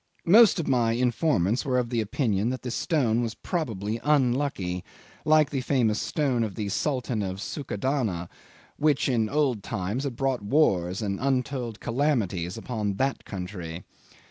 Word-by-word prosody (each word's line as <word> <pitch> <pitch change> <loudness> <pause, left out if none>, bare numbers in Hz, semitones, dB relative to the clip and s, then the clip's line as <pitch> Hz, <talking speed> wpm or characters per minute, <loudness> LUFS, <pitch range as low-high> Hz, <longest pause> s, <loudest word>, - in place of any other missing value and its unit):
Most 210 +2 +7
of 165 - -2
my 120 -3 +2
informants 120 - +1
were 130 -2 0
of 120 -1 -1
the 115 -2 +1
opinion 110 -1 0
that 130 0 -4
the 125 - -3
stone 120 -6 +1
was 115 -2 -3
probably 115 - -3
unlucky, 130 -10 +1 0.4
like 155 -1 +4
the 135 -3 -1
famous 120 -5 +1
stone 135 -8 0
of 105 -4 -4
the 105 -3 -3
Sultan 125 0 -1
of 95 -1 -3
Succadana, 110 - -2 0.5
which 145 -2 +2
in 115 -5 +1
the - - -9
old 140 -7 +1
times 105 +4 -3
had 135 -4 -3
brought 135 -1 0
wars 100 - +2
and 100 -2 -2
untold 125 -3 -1
calamities 115 - 0
upon 110 -4 -3
that 135 +6 -1
country. 90 -3 -6
120 Hz, 155 wpm, -26 LUFS, 100-140 Hz, 0.5 s, Most